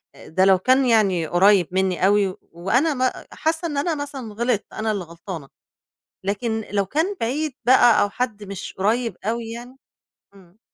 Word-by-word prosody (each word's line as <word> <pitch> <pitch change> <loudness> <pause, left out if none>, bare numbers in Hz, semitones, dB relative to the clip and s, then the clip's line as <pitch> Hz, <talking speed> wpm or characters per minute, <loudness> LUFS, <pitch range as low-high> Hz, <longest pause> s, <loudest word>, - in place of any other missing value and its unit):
آآ، - - -14
ده 185 +4 +2
لو 190 -1 +6
كان 260 +7 +3
يعني 200 -8 +2
قريّب 185 +1 +4
مني 185 -1 +1
أوي، 200 -1 +2 0.2
وأنا 235 - +1
ما 255 -1 -1
حاسّة 320 +2 -2
إن 295 -3 -4
أنا 315 +3 0
مثلًا 275 -6 -6
غلطت، 235 -1 -1
أنا 220 0 -1
اللي 200 -4 -3
غلطانة، 170 -2 -8 0.8
لكن 220 +3 -2
لو 200 -1 +1
كان 320 - -1
بعيد 280 +5 -1
بقى 245 -2 +6
أو 205 - +2
حد 215 -2 -3
مش 195 -2 -7
قريّب 220 +1 0
أوي 230 +1 -2
يعني 240 +2 -9 0.6
امم. 190 0 -20
215 Hz, 170 wpm, -22 LUFS, 190-255 Hz, 0.8 s, لو